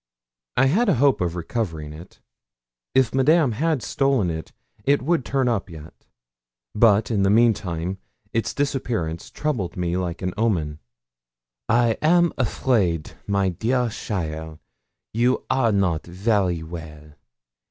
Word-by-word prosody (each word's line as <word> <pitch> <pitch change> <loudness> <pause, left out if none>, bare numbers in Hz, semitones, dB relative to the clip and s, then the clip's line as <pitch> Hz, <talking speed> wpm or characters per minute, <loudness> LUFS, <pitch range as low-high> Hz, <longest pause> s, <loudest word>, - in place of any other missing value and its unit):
I 135 - +5
had 205 - +3
a 185 - +4
hope 135 -1 +3
of 85 -1 -1
recovering 80 -5 -4
it. 80 +4 -13 0.7
If 130 -4 +3
Madame 140 +1 +4
had 150 +3 0
stolen 135 -10 +1
it, 80 0 -6 0.3
it 140 +2 +2
would 165 -1 +1
turn 135 0 0
up 110 -5 -1
yet. 80 -1 -11 0.8
But 110 0 +4
in 105 -3 +1
the 95 - +3
meantime 95 -5 +1 0.3
its 115 - 0
disappearance 120 - -2
troubled 120 - -3
me 90 -1 -1
like 90 -1 -3
an 90 -1 -1
omen. 85 -10 0 0.9
'I 115 0 +3
am 170 +2 +4
afraid, 105 - 0 0.2
my 100 -1 +1
dear 120 +7 0
cheaile, 80 -7 -4 0.6
you 120 +3 +1
are 120 -4 +2
not 95 -6 +1
very 90 -2 0
well. 75 -2 -9
105 Hz, 130 wpm, -23 LUFS, 85-130 Hz, 0.9 s, I